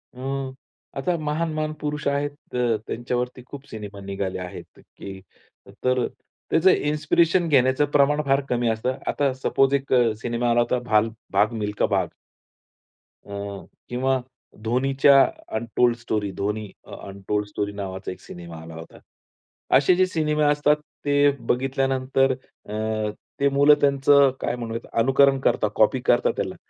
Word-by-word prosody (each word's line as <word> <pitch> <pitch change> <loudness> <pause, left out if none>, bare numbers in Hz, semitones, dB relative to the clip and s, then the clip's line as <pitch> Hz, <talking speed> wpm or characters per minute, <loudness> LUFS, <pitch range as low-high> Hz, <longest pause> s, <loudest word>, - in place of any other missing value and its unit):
अं, 135 +1 -4 0.4
आता 155 +6 0
महान-महान 155 0 -2
पुरुष 150 0 -3
आहेत 140 +1 0 0.2
अ, 120 -3 +1
त्यांच्यावरती 125 +1 -3
खूप 140 +1 -10
सिनेमा 105 -2 -8
निघाले 95 -1 -3
आहेत 90 0 -7
अ, - - -17 0.2
की 95 -1 -8 0.6
तर 125 -1 +2 0.5
त्याचं 165 +4 +5
इन्स्पिरेशन 160 +4 +2
घेण्याचं 130 0 +3
प्रमाण 145 +1 +3
फार 135 0 +3
कमी 120 -1 0
असतं. 120 +4 -1
आता 140 -2 +1
सपोज 135 +1 +1
एक 140 -1 0
अ, 120 -3 +4
सिनेमा 120 0 -1
आला 120 0 +3
होता 125 +1 0
भाल 110 +1 +3 0.2
भाग 105 +3 +3
मिल्खा 105 0 0
भाग. - - 0 1.2
अं, 100 -1 -6 0.2
किंवा 130 +2 0 0.4
धोनीच्या 135 +4 +4 0.3
अनटोल्ड 120 +2 +1
स्टोरी. 110 -4 -2
धोनी 105 +2 -2 0.2
अ - - -10
अनटोल्ड 100 +2 -3
स्टोरी 105 0 -3
नावाचा 95 -1 -5
एक 90 - -10
सिनेमा 85 -2 -10
आला 80 0 -10
होता. 80 0 -11 0.8
असे 145 +7 +4
जे 185 +1 +4
सिनेमे 155 -3 0
असतात 145 0 +3 0.3
ते 145 0 +1 0.4
बघितल्यानंतर 135 +1 +1
अ, 130 -4 -13 0.7
ते 140 - +3
मुलं 140 +2 +5
त्यांचं 140 0 +5
काय - - -1
म्हणूयात 115 -1 -6
अनुकरण 135 +3 +4
करतात, - - +1
कॉपी - - +3
करतात - - +3
त्याला. - - -3
130 Hz, 140 wpm, -24 LUFS, 110-140 Hz, 1.2 s, त्याचं